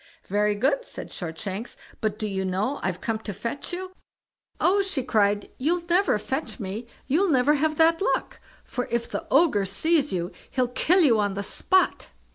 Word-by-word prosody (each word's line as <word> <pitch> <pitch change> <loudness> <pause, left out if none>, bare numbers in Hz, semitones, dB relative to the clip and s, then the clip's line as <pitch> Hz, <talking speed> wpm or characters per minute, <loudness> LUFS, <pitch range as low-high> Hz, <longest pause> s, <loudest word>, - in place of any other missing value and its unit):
"Very 205 +1 +2
good", 270 - +1
said - - -9
Shortshanks; 190 +6 -5 0.2
"but 215 -2 -1
do 215 - -2
you 190 -2 -2
know 195 +9 -1
I've 185 -1 -2
come 225 -1 -1
to 210 -3 -6
fetch 235 +8 -4
you?" 370 +1 -5 0.7
"Oh!" 395 +3 +4
she 380 -9 -1
cried, 205 -4 +1
"you'll 335 +6 +1
never 355 - +3
fetch 265 +7 -4
me; 210 +3 -5 0.2
you'll 350 +8 +2
never 275 0 +4
have 305 +1 +1
that 330 +2 +4
luck, - - 0 0.2
for 250 - -4
if 235 0 -1
the - - -5
Ogre 275 - +4
sees 300 - +1
you, 175 -1 -2 0.2
he'll 255 -2 0
kill 360 +9 +3
you 240 -9 +5
on 205 -2 0
the 200 - -2
spot." 375 - +1
245 Hz, 180 wpm, -25 LUFS, 205-320 Hz, 0.7 s, you